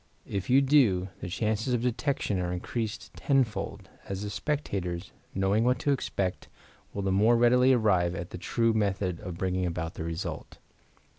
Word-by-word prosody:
If 100 Hz, -1 st, -4 dB
you 135 Hz, +2 st, +6 dB
do, 115 Hz, -10 st, +4 dB
the 90 Hz, -, -5 dB
chances 110 Hz, +6 st, 0 dB
of 120 Hz, -, -2 dB
detection 125 Hz, -5 st, 0 dB
are 90 Hz, -1 st, -1 dB
increased 105 Hz, +3 st, -4 dB
tenfold, 135 Hz, -6 st, 0 dB, 0.2 s
as 100 Hz, +1 st, -3 dB
the 105 Hz, -, -4 dB
spectators, 100 Hz, -, -3 dB, 0.2 s
knowing 95 Hz, +3 st, +2 dB
what 125 Hz, +1 st, +3 dB
to 145 Hz, -, +2 dB
expect, 100 Hz, -8 st, -2 dB, 0.4 s
will 100 Hz, -, -4 dB
the 95 Hz, -, +1 dB
more 110 Hz, +5 st, +4 dB
readily 125 Hz, +2 st, +5 dB
arrive 95 Hz, -8 st, +3 dB
at 85 Hz, -1 st, -6 dB
the -, -, -6 dB
true 115 Hz, +4 st, +1 dB
method 100 Hz, -4 st, 0 dB
of 90 Hz, -5 st, -7 dB
bringing 90 Hz, 0 st, 0 dB
about 85 Hz, -1 st, -3 dB
the -, -, -5 dB
result. 85 Hz, 0 st, -5 dB
100 Hz, 165 wpm, -28 LUFS, 90-120 Hz, 0.4 s, you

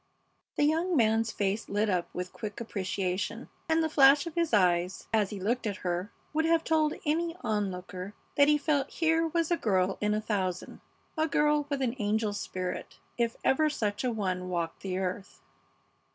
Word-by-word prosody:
The -, -, +2 dB
young 325 Hz, +3 st, +2 dB
man's 225 Hz, -1 st, +3 dB
face 200 Hz, +2 st, -1 dB
lit 205 Hz, +2 st, +1 dB
up 180 Hz, -4 st, 0 dB
with 180 Hz, 0 st, -4 dB
a -, -, -31 dB
quick 210 Hz, -2 st, -6 dB
appreciation, 195 Hz, +1 st, -3 dB, 0.2 s
and 320 Hz, 0 st, +3 dB
the -, -, +2 dB
flash 285 Hz, -1 st, +6 dB
of 335 Hz, -, -6 dB
his 335 Hz, -1 st, 0 dB
eyes 180 Hz, -3 st, +2 dB
as 210 Hz, -3 st, +3 dB
he 205 Hz, -, -6 dB
looked 230 Hz, +5 st, -1 dB
at 205 Hz, -, -2 dB
her 180 Hz, +3 st, -1 dB, 0.2 s
would 320 Hz, +1 st, +1 dB
have 330 Hz, 0 st, +3 dB
told 310 Hz, -1 st, +2 dB
any 330 Hz, +2 st, 0 dB
onlooker 195 Hz, -3 st, -3 dB, 0.2 s
that 285 Hz, 0 st, +6 dB
he 300 Hz, 0 st, +5 dB
felt 285 Hz, -2 st, 0 dB
here 325 Hz, 0 st, +2 dB
was 335 Hz, 0 st, 0 dB
a 345 Hz, -, +3 dB
girl 190 Hz, -, +1 dB
in 210 Hz, 0 st, +2 dB
a -, -, +1 dB
thousand, 190 Hz, -4 st, -3 dB, 0.3 s
a 315 Hz, -1 st, +1 dB
girl 295 Hz, -1 st, +2 dB
with 280 Hz, -2 st, -1 dB
an 235 Hz, -2 st, 0 dB
angel 210 Hz, 0 st, 0 dB
spirit, 185 Hz, -2 st, -5 dB, 0.2 s
if 235 Hz, -1 st, +1 dB
ever 305 Hz, +3 st, +3 dB
such 205 Hz, -7 st, -2 dB
a 250 Hz, -, +1 dB
one 185 Hz, -4 st, -2 dB
walked 170 Hz, -2 st, -3 dB
the 185 Hz, -1 st, -3 dB
earth. 190 Hz, +1 st, -4 dB
220 Hz, 185 wpm, -29 LUFS, 190-300 Hz, 0.3 s, flash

